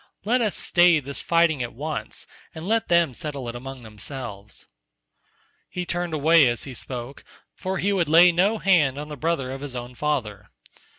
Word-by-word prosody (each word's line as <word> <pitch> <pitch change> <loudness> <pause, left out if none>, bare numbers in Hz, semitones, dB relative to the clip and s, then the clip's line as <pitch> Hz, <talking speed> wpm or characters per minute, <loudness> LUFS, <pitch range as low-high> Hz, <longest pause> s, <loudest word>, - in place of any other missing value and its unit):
Let 245 +4 +2
us 215 -4 0
stay 175 -2 +4
this 140 0 -6
fighting 170 -4 +2
at 120 -2 -5
once 150 +4 -5 0.3
and 160 +3 -7
let 225 +1 +1
them 170 -5 +3
settle 140 -1 -6
it - - -5
among 130 +1 -8
themselves." 105 -1 -8 1.0
He 180 0 -4
turned 175 -2 -2
away 155 -1 +5
as 120 -1 0
he 135 - -8
spoke, 125 +2 -7 0.3
for 190 +1 -4
he 200 +3 0
would 175 -5 0
lay 170 +3 +7
no 195 +6 +2
hand 160 -10 +3
on 150 +1 -6
the 150 - -6
brother 145 -3 -1
of 135 +1 -6
his 140 -3 -6
own 120 0 -6
father. 115 -8 -3
150 Hz, 180 wpm, -24 LUFS, 125-175 Hz, 1.0 s, lay